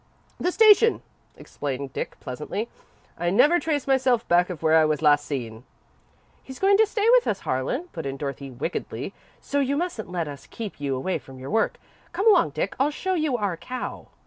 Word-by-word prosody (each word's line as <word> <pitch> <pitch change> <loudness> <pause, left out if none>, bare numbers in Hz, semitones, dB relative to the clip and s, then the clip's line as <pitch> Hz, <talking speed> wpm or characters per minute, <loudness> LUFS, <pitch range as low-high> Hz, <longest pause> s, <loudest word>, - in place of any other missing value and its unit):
"The 360 - 0
station," 445 +2 +5 0.3
explained 135 -1 -5
Dick, - - -5
pleasantly. 150 - -4 0.5
"I 175 0 +1
never 295 - +5
trace 300 -5 -1
myself 260 -3 +2
back 175 +1 +3
of 170 -3 -7
where 160 0 +4
I 160 - +6
was 155 -1 0
last 145 -1 +4
seen." 115 -5 -5 0.8
"He's 265 -1 -10
going 395 +1 +4
to 440 - +5
stay 430 0 0
with - - +5
us, 195 - -1
Harlan," 130 - -1
put - - -5
in 135 0 -4
Dorothy, 140 -1 -5
wickedly, 130 +7 -4 0.3
"so 285 - -1
you 280 +1 +1
mustn't 330 - -3
let 170 -3 -2
us 140 -2 -9
keep 215 -9 -7
you 140 -2 -1
away 180 +9 -2
from 135 -1 -13
your 130 +1 -7
work. 225 +1 +1 0.4
Come 390 +6 0
along, 405 - +6
Dick, 155 +7 -3
and 270 - +4
I'll - - +1
show 375 +5 -2
you 310 -7 0
our 200 -5 -1
cow." 250 +9 -6
195 Hz, 200 wpm, -25 LUFS, -, 0.8 s, I